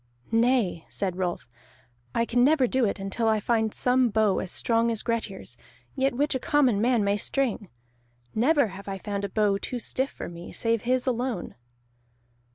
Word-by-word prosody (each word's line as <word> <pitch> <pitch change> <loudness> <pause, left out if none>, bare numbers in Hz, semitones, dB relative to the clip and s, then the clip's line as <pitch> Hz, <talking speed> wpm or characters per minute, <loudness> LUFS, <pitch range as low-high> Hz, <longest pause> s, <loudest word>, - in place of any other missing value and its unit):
"Nay," 230 -7 +2
said 190 -3 -2
Rolf. 180 -8 -3 0.7
"I 230 - +2
can 245 +1 +2
never 285 -1 +4
do 255 0 +1
it 200 - -2
until 195 +4 -2
I 220 -1 +3
find 220 0 +1
some 250 +1 +2
bow 215 -2 +2
as 185 - -4
strong 230 +4 +1
as 225 -2 -1
Grettir's, 225 -5 -3 0.4
yet 270 -2 +1
which 290 +4 +1
a 260 - -1
common 255 -8 +2
man 240 -2 +3
may 200 +1 +1
string. 230 -5 -1 0.6
Never 280 +1 +3
have 195 +1 -10
I 195 -1 -3
found 200 0 -4
a - - -4
bow 205 0 +1
too 250 - -4
stiff 260 +3 -1
for - - -8
me, 170 0 -9
save 230 -1 0
his 250 +2 0
alone." 245 -6 -2
230 Hz, 175 wpm, -26 LUFS, 200-250 Hz, 0.7 s, never